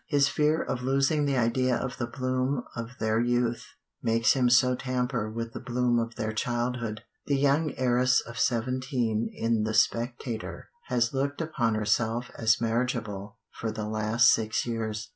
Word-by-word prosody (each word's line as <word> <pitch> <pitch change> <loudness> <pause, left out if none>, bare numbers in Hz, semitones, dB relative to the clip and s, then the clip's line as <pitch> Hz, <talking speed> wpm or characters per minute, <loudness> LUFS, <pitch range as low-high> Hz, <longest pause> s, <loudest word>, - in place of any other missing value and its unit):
His 140 -2 +3
fear 150 +3 +2
of 125 - -3
losing 135 +3 +2
the 140 -2 +1
idea 125 +2 +2
of 130 0 -3
the 120 - -1
bloom 130 +1 -1
of 115 +2 -6
their 110 0 +1
youth 120 0 0 0.3
makes 115 +1 +3
him 125 -2 +2
so 125 +1 +5
tamper 125 -3 -2
with 115 +1 -5
the - - -5
bloom 125 -1 +1
of 115 0 -3
their 110 0 -3
childhood. 120 -1 -2 0.2
The 140 - +2
young 145 +2 +2
heiress 125 0 +3
of 115 0 -8
seventeen 120 -1 0
in 115 -1 0
the 110 0 -1
Spectator 115 +1 -1 0.2
has 115 0 0
looked 140 +1 -1
upon 130 -9 0
herself 110 +3 0
as 110 -1 +2
marriageable 110 -3 -2
"for 110 - -4
the 110 -1 -4
last 110 +2 +3
six 110 -1 0
years." 110 -3 -3
120 Hz, 160 wpm, -28 LUFS, 115-130 Hz, 0.3 s, so